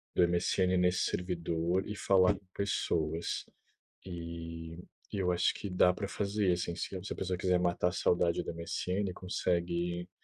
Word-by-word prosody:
do 90 Hz, -, +6 dB
MSN 90 Hz, +1 st, +2 dB
nesse 90 Hz, 0 st, +3 dB
servidor 85 Hz, 0 st, 0 dB
e 105 Hz, -, -4 dB
falar 95 Hz, 0 st, +4 dB
com 95 Hz, -, -14 dB
pessoas. 85 Hz, -4 st, -1 dB, 0.6 s
E 85 Hz, -2 st, -6 dB, 0.4 s
eu 95 Hz, -3 st, +1 dB
acho 90 Hz, -, +2 dB
que 100 Hz, -, -5 dB
dá 90 Hz, 0 st, +4 dB
pra 100 Hz, 0 st, -4 dB
fazer, 100 Hz, -1 st, 0 dB
assim, 85 Hz, -1 st, -1 dB
se 95 Hz, -, -4 dB
a 95 Hz, +3 st, -5 dB
pessoa 90 Hz, -1 st, -2 dB
quiser 90 Hz, -2 st, +2 dB
matar 90 Hz, 0 st, +2 dB
a -, -, -3 dB
saudade 85 Hz, -2 st, +2 dB
do -, -, -4 dB
MSN, 90 Hz, +3 st, -2 dB
consegue, 85 Hz, -1 st, -1 dB
90 Hz, 150 wpm, -32 LUFS, 85-95 Hz, 0.6 s, do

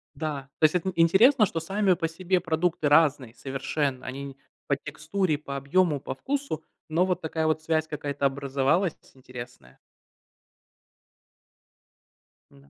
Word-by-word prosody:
Да, 150 Hz, -3 st, -3 dB, 0.2 s
то -, -, -6 dB
есть 155 Hz, +2 st, +5 dB
эт 180 Hz, -, 0 dB
н 190 Hz, -, -1 dB
интересно, 210 Hz, -, +5 dB
что 165 Hz, -4 st, -3 dB
сами 195 Hz, +3 st, +1 dB
по 165 Hz, -1 st, -1 dB
себе 180 Hz, +3 st, 0 dB
продукты 160 Hz, -1 st, 0 dB
разные 145 Hz, -5 st, +3 dB
совершенно. 135 Hz, 0 st, -3 dB
Они 135 Hz, +1 st, -6 dB, 0.3 s
по 140 Hz, -, +1 dB
текстуре, 155 Hz, +3 st, -2 dB
по 140 Hz, -2 st, -6 dB
объему, 150 Hz, +2 st, +2 dB
по 130 Hz, -, -6 dB
вкусу, 275 Hz, -, -3 dB, 0.2 s
но 165 Hz, +3 st, +2 dB
вот 180 Hz, -1 st, -1 dB
такая 160 Hz, 0 st, -2 dB
вот 155 Hz, 0 st, +1 dB
связь 160 Hz, 0 st, 0 dB
какая-то 145 Hz, -2 st, -3 dB
образовалась 140 Hz, +6 st, +1 dB, 0.2 s
интересная. 120 Hz, -, -11 dB, 2.7 s
М-да, 70 Hz, 0 st, -20 dB
155 Hz, 135 wpm, -26 LUFS, 140-175 Hz, 2.7 s, есть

